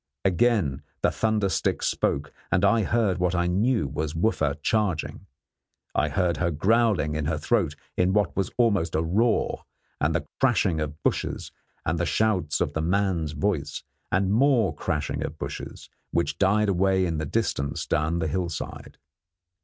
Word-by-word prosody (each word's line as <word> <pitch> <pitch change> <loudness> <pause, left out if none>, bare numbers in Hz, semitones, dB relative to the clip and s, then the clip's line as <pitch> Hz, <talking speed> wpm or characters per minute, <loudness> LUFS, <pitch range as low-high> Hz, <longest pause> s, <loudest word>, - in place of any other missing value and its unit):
Again 95 - +2 0.2
the - - +4
thunder 110 -2 +1
stick 95 - -1
spoke, 70 +1 0 0.2
and - - +3
I 115 - +4
heard 105 -3 +1
what 90 0 +1
I 85 0 +1
knew 100 - +1
was 75 +2 -3
Wooffa 80 -6 0
charging. 105 -7 -1 0.7
I 75 +4 +1
heard 85 +3 0
her 85 - +1
growling 95 -1 +2
in 75 -1 -2
her 80 +1 0
throat 75 - +1 0.2
in 90 +1 +2
what 105 -2 +1
was 95 -2 0
almost 100 -9 +2
a 80 - +1
roar, 110 +8 +1 0.4
and - - +1
the - - -1
crashing 105 -10 +2
of 75 +1 -5
bushes - - -1 0.3
and 80 +2 0
the 85 - 0
shouts 95 -9 +1
of - - 0
the 80 - -1
man's 85 -3 0
voice, 75 -2 -2 0.3
and 95 +1 +2
more 120 -4 +3
crashing 75 0 -2
of - - -5
bushes, - - -7 0.2
which 85 - -1
died 105 +2 +3
away 95 0 +2
in 80 -3 -1
the 80 - -2
distance 70 -9 -1
down 80 +2 0
the 80 -2 -1
hillside. 85 +1 -4
90 Hz, 160 wpm, -26 LUFS, 80-105 Hz, 0.7 s, the